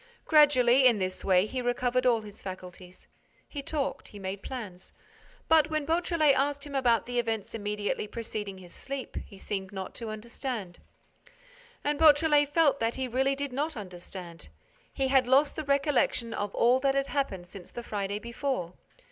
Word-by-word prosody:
Gradually, 265 -4 +6
in 235 -3 +4
this 185 -1 -3
way, 185 0 +4
he 255 +4 -3
recovered 245 +1 +1
all 235 -2 +3
his 210 -1 -11
faculties. 185 -1 -9 0.4
He 285 - -6
talked. 280 0 -3
He 205 - -12
made 195 0 -5
plans. 205 -9 -8 0.5
But, 315 -1 +5
when 310 -2 -1
Beautrelet 325 -2 +3
asked 280 +1 0
him 290 - -9
about 245 -5 +2
the 245 0 -1
events 225 -3 -2
immediately 210 -1 -2
preceding 210 -3 -5
his 180 -2 -13
sleep, 275 -1 -6
he 195 - -8
seemed 190 -1 -4
not 190 -1 -6
to 225 - -4
understand. 215 -3 -5 1.0
And 295 0 0
Beautrelet 295 -2 +5
felt 295 -3 +3
that 230 +1 0
he 260 -1 -2
really 265 +3 +1
did 280 -1 -4
not 295 +2 -2
understand. 180 - -9 0.4
He 270 -1 -1
had 260 -2 +4
lost 275 +3 +4
the 310 - -4
recollection 280 -4 +1
of 205 -1 -3
all 245 +2 +4
that 270 0 +1
had 275 0 +2
happened 270 -12 -2
since 180 0 -11
the 240 - -7
Friday 200 -2 -3
before. 235 -5 -3
245 Hz, 170 wpm, -29 LUFS, 205-280 Hz, 1.0 s, Gradually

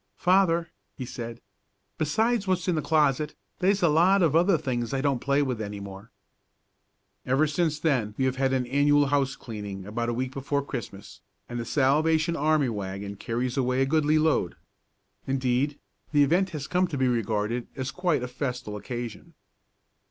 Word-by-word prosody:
"Father," 175 -3 +3 0.3
he 130 - -4
said, 120 -1 -7 0.6
"besides 215 +8 +1
what's 180 -3 0
in 180 - +2
the 155 - 0
closet, 150 -2 +1 0.2
they's 195 +1 +2
a - - +6
lot 175 +5 +4
of 160 -3 +2
other 175 +2 +4
things 125 -4 -2
I - - 0
don't 140 -3 +1
play 140 +1 +2
with 125 -5 -2
any 105 -1 -5
more." 100 +2 -9 1.1
Ever 135 +4 +2
since 155 0 0
then 125 -10 0
we 130 - +1
have 130 0 0
had 135 0 +1
an 130 -1 +1
annual 145 +3 +3
house 135 -1 +1
cleaning 105 -4 -7
about 115 +3 -2
a - - 0
week 130 +1 -2
before 140 +1 -2
Christmas, 105 -7 -7 0.3
and 120 - -5
the 115 - -4
Salvation 155 +6 +2
Army 150 -3 +2
wagon 100 -1 -5
carries 120 +5 -3
away 130 0 +2
a - - +2
goodly 155 +1 +2
load. 155 - +1 0.7
Indeed, 135 +2 0 0.3
the 145 -1 +5
event 175 +7 +2
has 150 -5 -5
come 180 +3 +1
to 145 - -4
be 130 -1 +2
regarded 115 0 -1
as 130 -1 -3
quite 175 -8 0
a - - -2
festal 125 -4 -4
occasion. 120 +2 -7
135 Hz, 175 wpm, -26 LUFS, 120-155 Hz, 1.1 s, a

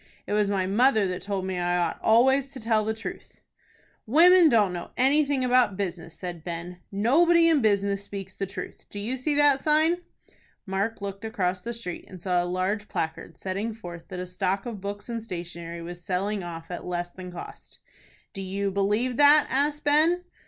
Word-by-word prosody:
It - - -3
was 210 -1 +2
my 195 -2 0
mother 220 +2 +3
that 180 -1 -3
told 195 -2 -3
me 185 -1 -2
I 175 0 +1
ought 175 - -1
always 265 +4 +4
to 265 - -8
tell 220 -1 +1
the 220 - -1
truth." 220 - -8 0.7
"Women 340 +6 +7
don't 210 -7 +3
know 175 -1 -6
anything 275 0 +3
about 245 -6 +3
business," 175 -4 -4
said 175 -3 -6
Ben. 175 +1 -6
"Nobody 330 - +4
in 320 -4 +4
business 200 -2 +1
speaks 195 -2 -8
the 195 - -3
truth. 195 - -8
Do - - -9
you 220 +6 -2
see 285 +3 -1
that 290 -2 +4
sign?" 310 +4 +3 0.7
Mark 200 +3 -2
looked 200 +1 -5
across 190 -5 -1
the 235 - -4
street, 230 -7 -6
and 185 - -11
saw 180 0 +1
a - - -2
large 185 +4 -1
placard, 160 +1 -4
setting 200 +4 -3
forth 175 -6 -9
that 180 - -6
a 180 - -3
stock 185 +2 -2
of 225 -5 -6
books 205 +1 -6
and 230 -2 -4
stationery 170 -3 -7
was 175 +1 -8
selling 195 +3 -1
off 165 -1 -8
at 175 - -5
less 175 0 -3
than 180 0 -9
cost. 175 - -10 0.6
"Do 195 - -6
you 195 +1 -2
believe 210 +6 0
that?" 295 +1 +7
asked 290 +2 0
Ben. 315 +5 +3
200 Hz, 190 wpm, -26 LUFS, 180-250 Hz, 0.7 s, Women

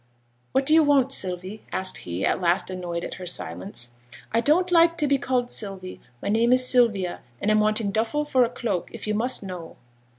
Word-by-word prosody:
'What 265 +1 +1
do 310 - +5
you 320 - +7
want, 280 -3 +3
Sylvie?' 185 -1 -2
asked 185 0 +1
he, 90 +2 -4
at - - 0
last 180 +1 +1
annoyed 175 -2 -4
at - - -6
her 180 -1 -8
silence. 100 - -4 0.4
'I 230 - +3
don't 350 +8 +2
like 335 -1 +5
to 300 - +1
be 280 -1 +2
called 245 -1 -1
"Sylvie;" 195 -3 -3 0.2
my - - -3
name 230 +3 +3
is 255 0 +3
Sylvia; 215 -9 +2 0.2
and 210 - +1
I'm 215 - +4
wanting 215 -1 +1
duffle 225 +8 0
for 260 -4 +3
a 235 - 0
cloak, 235 -7 -3
if - - -8
you 210 - -1
must 240 +2 0
know.' 180 -4 -8
215 Hz, 205 wpm, -24 LUFS, 180-255 Hz, 0.4 s, you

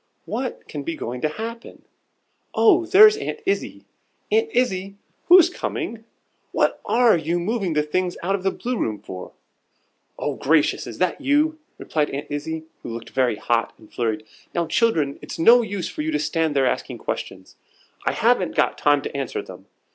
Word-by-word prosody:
"What 255 0 -4
can 145 - -5
be 165 +3 -4
going 125 -3 -5
to 155 - +1
happen? 230 +7 -7 0.7
Oh, 355 -5 +4
there's 420 +4 +8
Aunt 435 - -4
Izzie! 395 +1 -2 0.5
Aunt 445 +1 +3
Izzie, 195 - 0 0.3
who's 355 -1 +8
coming? 235 - -4 0.5
What - - +1
are 240 -3 +4
you 165 +1 -1
moving 195 -1 -1
the 150 0 +2
things 180 +4 -1
out 190 +3 0
of 200 - -1
the 195 - +1
Blue 245 +4 -3
room 110 -2 -1
for?" 90 -1 -9 0.8
"Oh, - - -2
gracious! 155 +1 +2
is - - -8
that 185 +8 0
you?" 300 +3 +2 0.2
replied 150 -2 -1
Aunt 140 +1 -6
Izzie, 160 +2 -4 0.2
who - - -7
looked 115 0 -7
very 130 -4 +1
hot 115 +2 -1
and 110 - -19
flurried. 110 -2 -2 0.3
"Now, 170 -1 +1
children, 160 -6 +1
it's - - -7
no 235 +9 +7
use 200 -5 -3
for - - -5
you 155 - -2
to 150 - +1
stand 155 0 0
there 135 -1 +3
asking - - -2
questions; 95 -1 -6 0.5
I - - 0
haven't - - +2
got - - +1
time 145 -1 +3
to - - -6
answer 135 -3 -3
them. - - -12
170 Hz, 175 wpm, -23 LUFS, 145-240 Hz, 0.8 s, there's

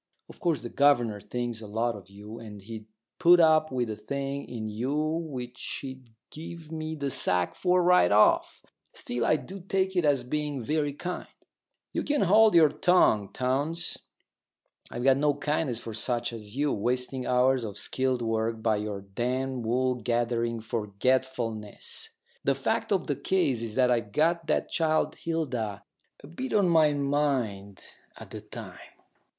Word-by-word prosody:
Of - - -13
course 170 -3 0
the 120 - -5
governor 120 -8 +3
thinks 120 -1 -4
a 110 - -8
lot 115 +2 -1
of 95 -2 -12
you, 105 +3 -10
and 105 -3 -9
he'd 110 0 -8 0.3
put 175 0 +7
up 155 -2 +5
with 125 -2 -1
a 110 - -4
thing 140 +6 -4
in 115 -3 -5
you 120 +7 -2
which 155 -6 -3
he'd 130 -2 -8 0.2
give 160 0 -9
me 160 0 -4
the 140 -2 -3
sack 90 -6 +1
for 180 -1 +2
right 175 - +5
off. 105 +1 +3 0.3
Still, 120 -1 -3
I 155 - +4
do 190 +5 -7
take 190 +1 -1
it 180 - +2
as 140 -4 +2
being 145 +2 -2
very 145 +4 0
kind 180 +5 -5 0.3
" - - -52
"You - - 0
can 295 -1 0
hold 215 +2 +5
your 160 -3 +7
tongue, 125 - +3
Townes. 145 +7 -1 0.9
I've 120 - -5
got 135 0 +5
no 145 0 +2
kindness 145 -3 -1
for 115 -1 -7
such 120 +2 -1
as 105 +1 -8
you 145 0 +1
wasting 125 +3 -2
hours 125 0 +3
of 105 -2 -6
skilled 130 -2 -1
work 115 0 -1
by 110 -2 +2
your 105 -1 -4
damned 125 +5 -3
wool 130 +2 +2
gathering 120 -1 -1
forgetfulness." 115 0 -2 0.3
"The - - +2
fact - - -1
of - - +1
the - - -1
case 145 -11 0
is 110 -2 -5
that 125 -1 +3
I'd 115 -4 -1
got 165 +2 +1
that - - +1
child 155 -1 +1
Hilda 125 -12 -3 0.4
a - - -10
bit 255 - -5
on 200 -4 +4
my 160 -3 +5
mind 135 -9 -1 0.3
at - - -11
the - - -7
time. - - -9
130 Hz, 165 wpm, -28 LUFS, 115-155 Hz, 0.9 s, put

